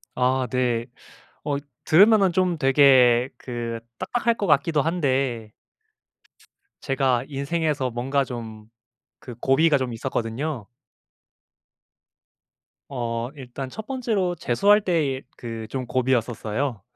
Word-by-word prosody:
아 130 +1 +1
네. 120 -2 0 0.6
어 145 -1 -1 0.3
들으면은 195 +2 +5
좀 180 -1 +1
되게 130 -3 +5
그 120 -2 -5 0.2
딱딱할 235 - 0
것 200 - -2
같기도 150 0 +3
한데 135 -9 -1 1.3
제가 135 -3 +1
인생에서 145 -1 -1
뭔가 135 +4 0
좀 110 -4 -8 0.6
그 120 -3 -9
고비가 145 +3 +3
좀 130 -2 -3
있었거든요. 120 +1 -3 2.2
어 120 -3 -3
일단 130 -1 -7
첫 220 +11 -8
번째로 220 -9 -1
재수할 200 - +3
때의 150 -8 0
그 115 -2 -6
좀 130 +2 -4
고비였었어요. 120 -2 -1
135 Hz, 210 characters per minute, -24 LUFS, 120-155 Hz, 2.2 s, 들으면은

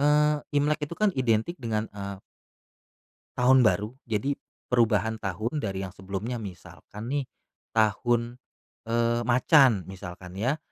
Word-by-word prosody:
eee, 150 +1 +4 0.2
Imlek 150 +1 +2
itu 170 - -7
kan 215 -1 +4
identik 120 +4 +1
dengan, 110 -1 -1
eee 100 -1 -6 1.2
tahun 130 +1 +6
baru, 105 +1 +2 0.2
jadi 115 +7 0 0.4
perubahan 110 -2 +2
tahun 110 - -2
dari 95 -2 -3
yang 90 - -9
sebelumnya, 100 +6 -4
misalkan 105 +3 -9
nih, 140 -1 -1 0.5
tahun, 120 +2 +1 0.5
eee, 120 0 +2
macan 125 - +5
misalkan 90 -1 -9
ya, 130 +9 +1
115 Hz, 125 wpm, -27 LUFS, 100-130 Hz, 1.2 s, tahun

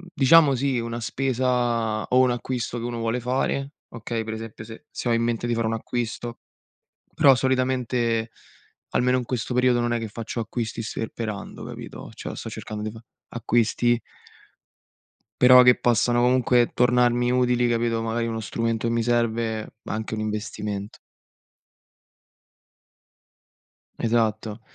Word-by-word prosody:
diciamo 140 0 +6
sì, 130 -1 0
una 115 0 -4
spesa 120 -2 0
o 125 - +2
un 130 -1 +4
acquisto 120 -1 -3
che - - -6
uno 120 -1 -4
vuole 115 +2 -1
fare, 135 +3 -1 0.2
okay, 115 0 -4
per 110 0 -5
esempio 110 -1 -7
se 110 +1 -11
se - - -5
ho 120 - +3
in 115 - +2
mente 120 0 -1
di 120 - 0
fare 115 -1 0
un 115 - -1
acquisto, 120 +1 -4 0.7
però 135 -2 +6
solitamente 125 -3 0 0.6
almeno 125 +1 +2
in 125 - -3
questo 125 0 -3
periodo 125 -1 +3
non 120 - 0
è 120 - 0
che 115 - -4
faccio 115 +2 -6
acquisti 115 0 -3
sperperando, 110 -1 -5
capito, - - -9
cioè - - -7
sto - - -6
cercando 105 -1 -6
di 110 - -3
fà 110 +1 -12 0.3
acquisti 120 +1 +2 1.4
però 125 0 +9
che 125 0 +7
possano 120 0 +2
comunque 125 -1 +3
tornarmi 120 0 +3
utili, 125 -1 +2
capito, 115 -1 0
magari 115 +1 -1
uno 115 -1 -3
strumento 115 +1 -2
che 115 - 0
mi 115 - +1
serve, 115 -2 -1
ma - - -5
anche 110 0 -4
un 110 - -3
investimento. 105 -1 -4 3.0
Esatto. 110 -1 0
120 Hz, 145 wpm, -24 LUFS, 115-125 Hz, 3.0 s, però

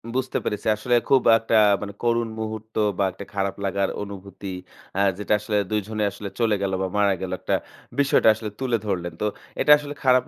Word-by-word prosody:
বুঝতে 130 0 -1
পেরেছি। 105 - -3
আসলে 120 +3 +1
খুব 135 -2 +6 0.2
একটা 115 0 -1 0.3
মানে 100 -1 -5
করুণ 120 -1 +2
মুহূর্ত 110 0 -6 0.2
বা 100 - +2
একটা 95 +2 -9
খারাপ 100 -1 -1
লাগার 100 0 0
অনুভূতি 100 -1 -9 0.5
আ - - +1 0.2
যেটা 105 0 0
আসলে 105 0 -1
দুই 105 - +2
জনে 110 -1 -2
আসলে 100 0 -7
চলে 115 -3 +3
গেলো, 95 -1 0
বা 95 - 0
মারা 100 -1 +4
গেলো 95 -1 -3
একটা, - - 0 0.4
বিষয়টা 140 -5 +5
আসলে 110 0 -5
তুলে 125 -3 +1
ধরলেন। 90 -4 -2
তো - - +1 0.4
এটা - - +4
আসলে 145 -1 -7
খারাপ 130 -2 +5
105 Hz, 195 wpm, -24 LUFS, 100-115 Hz, 0.5 s, খুব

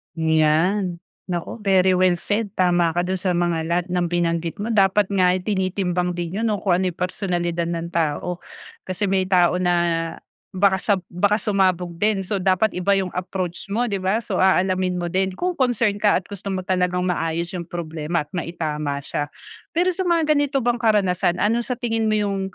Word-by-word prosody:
Yan. 165 +3 +1 0.3
Naku 175 +5 -4
very 190 -3 +3
well 185 -1 +3
said. 205 +5 -1
Tama 175 -2 +2
ka 175 - +1
dun 185 +1 -2
sa 180 -1 0
mga 170 -2 0
lahat 170 +1 0
ng 180 -1 +1
binanggit 170 -1 -1
mo. 230 - -2
Dapat 200 -1 +3
nga 185 -2 +3
ay 185 - -4
tinitimbang 185 -2 -1
din 175 +3 -3
yun, 230 - 0
no, 210 -3 -1
kung 180 -3 +2
ano 190 - +1
yung 175 - -4
personalidad 175 -2 -2
ng 170 0 -4
tao 170 +2 -1 0.5
kasi 190 +1 -1
may 190 -1 +1
tao 180 -1 +3
na 180 -1 +2 0.8
baka 190 0 +3
sab 195 -2 0
baka 200 +4 +2
sumabog 185 -5 0
din. 205 -1 +1
So 200 +1 -2
dapat 190 +3 +2
iba 180 +2 +1
yung 190 -2 -1
approach 180 0 -4
mo, 230 +3 -1
di 200 - -1
ba? 195 +5 0
So 195 -4 -2
aalamin 185 -1 +2
mo 175 -1 -3
din 190 0 0
kung 360 - -1
concern 235 -5 +1
ka 210 -1 +4
gusto 200 +1 -9
mo 190 -1 -2
talagang 180 -1 0
maayos 170 -1 -1
yung 175 -3 -5
problema 160 -1 -3
at 150 - -27
maitama 155 -4 -3
siya. 145 0 -3 0.5
Pero 360 +2 +3
sa 365 +1 -2
mga 330 -3 +2
ganito 285 -3 +1
bang 240 0 +1
karanasan, 190 -6 +2
ano 225 +3 +2
sa 245 +1 -2
tingin 225 -2 -1
mo 215 - +2
yung 200 -2 0
185 Hz, 190 wpm, -22 LUFS, 175-205 Hz, 0.8 s, ka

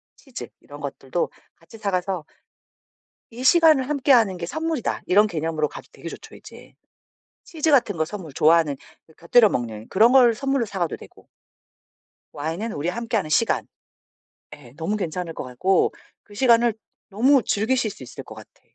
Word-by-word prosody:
치즈 265 -4 -9
이런 145 0 -12
것들도 140 +3 -3 0.3
같이 165 +7 -16
사가서 185 -5 -2 1.1
이 245 +2 -8
시간을 310 -3 +5
함께하는 255 -9 +3
게 175 - -5
선물이다 315 - -3
이런 210 +3 +5
개념으로 160 -4 -2
가도 - - -11
되게 - - -9
좋죠 - - -11
이제. - - -14 0.7
치즈 320 -2 -1
같은 230 - +3
거 160 - +1
선물 170 -4 -8
좋아하는 155 -1 +3 0.4
곁들여 215 +6 +5
먹는 110 -3 -4
그런 225 +6 +4
걸 245 -4 +6
선물로 270 -1 -1
사가도 185 -5 -3
되고 - - -17 1.0
와인은 165 +9 -4
우리 150 0 -3
함께하는 220 -4 -2
시간. 225 +9 +1 0.9
예 130 -5 -16
너무 175 +6 -2
괜찮을 175 -2 -4
것 - - -6
같고 130 +10 +1 0.3
그 205 - -18
시간을 235 0 +4 0.4
너무 250 +5 +3
즐기실 220 +2 0
수 135 - -12
있을 125 - -10
것 - - -12
같아. - - -15
205 Hz, 325 characters per minute, -23 LUFS, 160-240 Hz, 1.1 s, 걸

